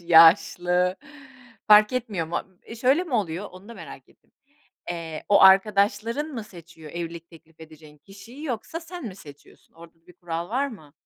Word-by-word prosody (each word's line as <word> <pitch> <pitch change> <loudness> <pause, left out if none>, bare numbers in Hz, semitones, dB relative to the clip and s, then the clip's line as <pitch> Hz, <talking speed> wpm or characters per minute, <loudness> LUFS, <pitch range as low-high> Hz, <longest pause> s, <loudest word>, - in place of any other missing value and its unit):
yaşlı 175 +2 +4 0.7
fark 210 +1 +6
etmiyor 220 -10 -3
mu? 170 - -2 0.3
Imm, 230 - -9
şöyle 265 +9 +2
mi 300 -8 -5
oluyor? 195 -2 -2
Onu 185 +3 -15
da 235 - -10
merak - - -12
ettim. - - -29 0.6
Eee, 165 -2 -6
o 205 - +5
arkadaşların 205 +7 +4
mı 225 - -5
seçiyor 170 -5 -14
evlilik 170 -1 -7
teklif 160 -1 -19
edeceğin 155 -1 -15
kişiyi 205 - -13
yoksa 265 +4 -5
sen 350 -1 -9
mi 210 -5 -6
seçiyorsun, 145 -4 -17
orada 165 0 -15
da - - -41
bir - - -16
kural 170 -1 -5
var 260 +6 0
mı? 155 - -13
185 Hz, 170 wpm, -24 LUFS, 165-225 Hz, 0.7 s, fark